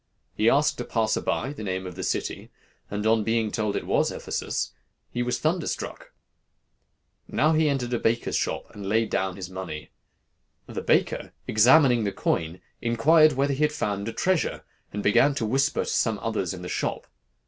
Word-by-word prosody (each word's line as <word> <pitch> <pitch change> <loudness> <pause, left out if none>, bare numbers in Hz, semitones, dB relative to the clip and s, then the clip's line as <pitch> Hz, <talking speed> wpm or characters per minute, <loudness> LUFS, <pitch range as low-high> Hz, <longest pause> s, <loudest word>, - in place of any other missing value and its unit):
He 110 +2 +3
asked 145 -1 +2
a - - -2
passer 110 -2 0
by 140 - -1
the 145 - -9
name 95 -2 -3
of 90 - -6
the 95 - -7
city, - - -3 0.4
and 105 +1 -3
on 110 0 +3
being 110 -1 0
told 105 -2 -1
it - - -2
was - - +2
Ephesus, - - -3 0.4
he 120 - -2
was 125 0 0
thunderstruck. 165 +2 -2 1.2
Now 155 +2 +2
he 155 -1 +3
entered 125 -3 -1
a 120 - +1
baker's 115 +1 0
shop, - - -2
and 105 - -8
laid 110 +1 +1
down 95 -1 0
his 95 -2 -7
money. 95 -5 -7 0.7
The - - -5
baker, - - +1
examining 125 +2 +5
the 100 - 0
coin, 80 -1 -2 0.2
inquired 155 +7 +5
whether 140 +2 +1
he 135 - -3
had 150 0 +3
found 100 -8 -2
a - - -2
treasure, 185 +6 0 0.3
and 105 0 -4
began 135 +7 +4
to 115 - -1
whisper 135 +5 +1
to - - -3
some 110 -3 +1
others 110 -6 -1
in 90 -1 -7
the - - -5
shop. - - -2
115 Hz, 180 wpm, -26 LUFS, 100-140 Hz, 1.2 s, examining